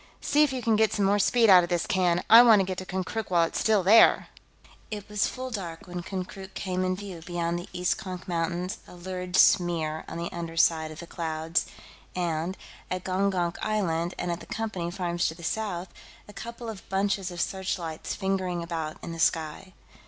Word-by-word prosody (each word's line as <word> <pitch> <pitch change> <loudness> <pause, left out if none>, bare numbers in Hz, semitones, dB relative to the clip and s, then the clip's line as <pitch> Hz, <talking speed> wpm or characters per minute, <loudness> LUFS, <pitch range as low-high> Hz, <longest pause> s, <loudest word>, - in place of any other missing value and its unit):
See 295 - +2
if 300 -3 +4
you 255 -2 -4
can 225 -1 +3
get 220 -1 +3
some 205 - +1
more 200 +1 +3
speed 230 +3 +4
out 185 -3 +9
of 175 - -4
this 175 -2 0
can. 180 -2 +1
I 230 +2 +10
want 230 -4 +7
to - - +3
get 185 0 -4
to 185 - -8
Konkrook 190 +4 -3
while 175 -2 +4
it's 165 - -1
still 215 -4 +3
there!" 215 +5 +6 0.6
It 210 -2 -6
was 210 -1 +1
full 255 0 -6
dark 175 -7 -6
when 180 -1 -5
Konkrook 190 +1 -7
came 185 -1 -2
in 185 0 0
view 190 -4 -8
beyond 170 0 -2
the 175 - -9
East 180 0 0
Konk 185 -2 -7
Mountains, 175 +1 -2
a - - -12
lurid 180 0 -5
smear 165 -6 +3
on - - -6
the 170 0 -4
underside 165 -1 +1
of 155 +2 -9
the - - -8
clouds, 165 -1 -2 0.5
and, 175 0 -2 0.3
at 185 0 -3
Gongonk 185 -2 0
Island 175 -5 -1
and 175 - -2
at 170 - -3
the - - -12
Company 215 -6 -3
farms 175 -1 -1
to 160 - -4
the 170 - -13
south, 190 -2 -3 0.4
a 210 - -12
couple 235 +3 -8
of 220 -3 -8
bunches 195 -1 0
of 175 -1 -8
searchlights 175 -4 -3
fingering 190 -3 -1
about 160 -2 -4
in - - -5
the 165 - -7
sky. 165 +4 0
185 Hz, 205 wpm, -27 LUFS, 170-200 Hz, 0.6 s, I